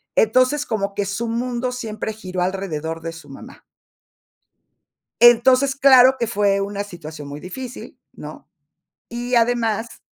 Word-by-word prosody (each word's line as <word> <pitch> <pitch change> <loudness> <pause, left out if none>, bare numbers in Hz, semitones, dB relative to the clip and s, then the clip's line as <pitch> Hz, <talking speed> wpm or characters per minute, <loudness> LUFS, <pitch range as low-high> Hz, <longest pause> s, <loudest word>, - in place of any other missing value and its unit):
Entonces, 255 +6 +2
como 200 -3 -3
que 205 - -1
su 200 +4 -3
mundo 245 +2 -2
siempre 220 -3 -5
giró 185 -4 -6
alrededor 165 -4 -3
de 165 0 -5
su 165 - -13
mamá. - - -13 1.6
Entonces, 255 +3 +5
claro 265 -1 +6
que 235 - +1
fue 200 -3 +1
una 200 0 -3
situación 160 -6 -10
muy 145 +1 -8
difícil, 245 +9 -9
¿no? - - -11 0.6
Y 240 +1 -3
además 230 -1 0
220 Hz, 130 wpm, -20 LUFS, 195-245 Hz, 1.6 s, claro